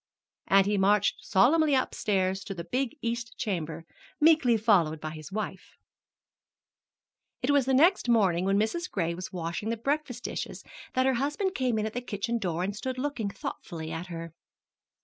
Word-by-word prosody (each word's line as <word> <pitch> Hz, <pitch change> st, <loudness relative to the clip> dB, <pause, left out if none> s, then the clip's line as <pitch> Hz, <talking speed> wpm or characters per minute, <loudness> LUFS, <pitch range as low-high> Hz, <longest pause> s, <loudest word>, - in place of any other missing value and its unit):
And 195 Hz, 0 st, +5 dB
he 205 Hz, 0 st, +1 dB
marched 205 Hz, +1 st, +2 dB
solemnly 290 Hz, +8 st, +4 dB
upstairs 190 Hz, -6 st, 0 dB
to 195 Hz, -, -5 dB
the 170 Hz, -, -5 dB
big 260 Hz, -, -2 dB
east 230 Hz, -1 st, -3 dB
chamber, 165 Hz, -7 st, -3 dB, 0.3 s
meekly 300 Hz, -7 st, +5 dB
followed 180 Hz, -8 st, +3 dB
by 155 Hz, 0 st, -5 dB
his 155 Hz, -1 st, -9 dB
wife. 195 Hz, -2 st, -5 dB, 1.7 s
It 265 Hz, -, +2 dB
was 280 Hz, -3 st, +3 dB
the 265 Hz, -, +2 dB
next 330 Hz, -1 st, +4 dB
morning 190 Hz, -7 st, +3 dB
when 195 Hz, +1 st, +2 dB
Mrs. 280 Hz, -, 0 dB
Gray 170 Hz, -3 st, -1 dB
was 180 Hz, +2 st, -6 dB
washing 175 Hz, +3 st, -3 dB
the 230 Hz, -, -1 dB
breakfast 275 Hz, 0 st, -2 dB
dishes -, -, -5 dB, 0.3 s
that 255 Hz, 0 st, +3 dB
her 265 Hz, -, +3 dB
husband 370 Hz, +7 st, -1 dB
came 255 Hz, -8 st, 0 dB
in 215 Hz, -, 0 dB
at 220 Hz, -, -4 dB
the 245 Hz, -, -3 dB
kitchen 235 Hz, 0 st, -2 dB
door 175 Hz, -4 st, -1 dB
and 200 Hz, +2 st, -2 dB
stood 255 Hz, +4 st, -4 dB
looking 255 Hz, -6 st, -2 dB
thoughtfully 160 Hz, -4 st, -6 dB
at 165 Hz, +2 st, -5 dB
her. 165 Hz, -2 st, -7 dB
215 Hz, 170 wpm, -28 LUFS, 185-255 Hz, 1.7 s, And